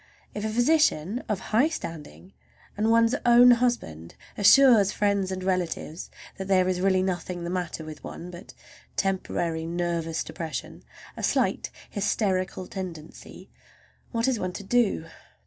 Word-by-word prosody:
If 210 Hz, -, -5 dB
a 220 Hz, -, -1 dB
physician 240 Hz, -, +2 dB
of 210 Hz, -3 st, 0 dB
high 255 Hz, +9 st, +4 dB
standing, 170 Hz, -, -8 dB, 0.4 s
and 215 Hz, +2 st, 0 dB
one's 230 Hz, +1 st, +4 dB
own 245 Hz, +1 st, +7 dB
husband, 230 Hz, -, -1 dB, 0.2 s
assures 215 Hz, -1 st, +6 dB
friends 200 Hz, -2 st, 0 dB
and 185 Hz, 0 st, -4 dB
relatives 180 Hz, -3 st, -3 dB, 0.3 s
that 190 Hz, -, -4 dB
there 185 Hz, -2 st, +3 dB
is 180 Hz, -1 st, -1 dB
really 190 Hz, -1 st, +2 dB
nothing 180 Hz, -1 st, -3 dB
the 170 Hz, -, -4 dB
matter 175 Hz, -3 st, -4 dB
with 155 Hz, -1 st, -10 dB
one 180 Hz, +1 st, -8 dB
but 180 Hz, +3 st, -12 dB, 0.4 s
temporary 170 Hz, -4 st, -1 dB
nervous 170 Hz, -1 st, -2 dB
depression—a 160 Hz, -2 st, -8 dB
slight -, -, 0 dB, 0.2 s
hysterical 190 Hz, -3 st, -1 dB
tendency—what 185 Hz, +6 st, -8 dB
is 255 Hz, -4 st, +1 dB
one 185 Hz, -1 st, -3 dB
to 200 Hz, -, -7 dB
do? 210 Hz, -6 st, +1 dB
190 Hz, 130 wpm, -26 LUFS, 175-220 Hz, 0.4 s, own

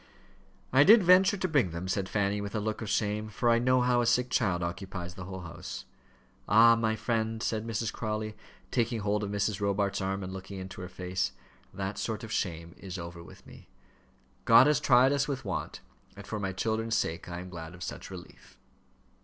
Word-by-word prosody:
"I 135 Hz, +2 st, +7 dB
did 215 Hz, +4 st, +8 dB
venture 185 Hz, +3 st, +6 dB
to 185 Hz, -, -1 dB
bring 145 Hz, -, +2 dB
them," 85 Hz, +2 st, -5 dB
said 95 Hz, 0 st, -1 dB
Fanny, 100 Hz, 0 st, 0 dB
with 100 Hz, +1 st, -5 dB
a -, -, +1 dB
look 110 Hz, +1 st, -3 dB
of 110 Hz, -, -4 dB
shame, 105 Hz, 0 st, -1 dB
"for 120 Hz, +3 st, +1 dB
I 115 Hz, -, +4 dB
know 130 Hz, +1 st, +3 dB
how 125 Hz, 0 st, +3 dB
a 120 Hz, -, 0 dB
sick 125 Hz, +1 st, +2 dB
child 90 Hz, -7 st, +1 dB
occupies 90 Hz, 0 st, -5 dB
the 95 Hz, -2 st, -8 dB
whole 95 Hz, 0 st, -7 dB
house." 85 Hz, -3 st, -8 dB, 0.6 s
"Ah! 115 Hz, +3 st, +7 dB
my 110 Hz, -1 st, 0 dB
friend," 110 Hz, 0 st, -1 dB
said 110 Hz, 0 st, -2 dB
Mrs. 115 Hz, 0 st, -2 dB
Crawley, 110 Hz, -1 st, -3 dB, 0.4 s
taking 115 Hz, -2 st, 0 dB
hold 105 Hz, +1 st, 0 dB
of 100 Hz, -, -3 dB
Mrs. 100 Hz, 0 st, -1 dB
Robarts' 100 Hz, 0 st, 0 dB
arm 95 Hz, +1 st, -2 dB
and 95 Hz, 0 st, -6 dB
looking 95 Hz, +1 st, -8 dB
into 95 Hz, 0 st, -7 dB
her 90 Hz, -, -7 dB
face, 90 Hz, 0 st, -2 dB, 0.4 s
"that 95 Hz, +2 st, -4 dB
sort 110 Hz, -1 st, -3 dB
of 110 Hz, -, -7 dB
shame 85 Hz, -5 st, -3 dB
is 95 Hz, -1 st, -7 dB
over 85 Hz, -1 st, -7 dB
with -, -, -15 dB
me. -, -, -15 dB, 0.8 s
God 130 Hz, -, +8 dB
has 150 Hz, 0 st, +3 dB
tried 130 Hz, +1 st, +5 dB
us 140 Hz, 0 st, +1 dB
with 135 Hz, -4 st, -4 dB
want, 95 Hz, -4 st, -4 dB, 0.4 s
and -, -, -9 dB
for 110 Hz, -, -4 dB
my 95 Hz, -1 st, -2 dB
children's 110 Hz, +3 st, -1 dB
sake 85 Hz, -5 st, -2 dB
I 85 Hz, 0 st, -5 dB
am 90 Hz, 0 st, -9 dB
glad 85 Hz, -1 st, -8 dB
of 90 Hz, -, -8 dB
such -, -, -6 dB
relief." -, -, -12 dB
105 Hz, 205 wpm, -29 LUFS, 95-115 Hz, 0.8 s, did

